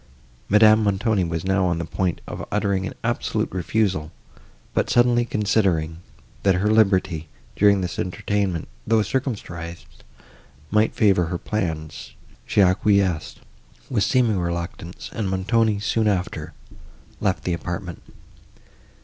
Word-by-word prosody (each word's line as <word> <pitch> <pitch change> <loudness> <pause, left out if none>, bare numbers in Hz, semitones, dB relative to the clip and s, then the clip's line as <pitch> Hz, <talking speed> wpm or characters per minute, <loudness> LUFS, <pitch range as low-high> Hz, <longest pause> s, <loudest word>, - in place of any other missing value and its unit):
Madame 110 +1 +6
Montoni 100 0 +1
was 85 0 -3
now 95 0 +2
on 85 -2 +1
the 85 - -3
point 90 +1 -2
of - - -6
uttering 100 -2 0
an - - -7
absolute - - -1
refusal, 90 -3 -1 0.6
but, - - 0
suddenly 120 0 +4
considering, 95 -8 +1 0.4
that 95 -2 +3
her 100 +4 +1
liberty, 95 -7 +2 0.3
during 100 -1 +4
this 90 -1 -4
entertainment, 95 -2 -1 0.2
though 110 -1 +3
circumscribed, 85 -11 -5 0.7
might 110 +1 +2
favour 95 -5 +3
her 85 +2 -3
further - - -22
plans, 80 -7 -3 0.3
she 105 - +3
acquiesced, 95 -3 +1 0.5
with 110 -6 +2
seeming 120 -7 +2
reluctance, 85 0 -5
and 105 -4 -2
Montoni, 105 +3 +1
soon 110 +1 0
after, 95 -4 -2 0.7
left - - 0
the 90 - -1
apartment. 85 0 -5
95 Hz, 125 wpm, -23 LUFS, 85-105 Hz, 0.7 s, Madame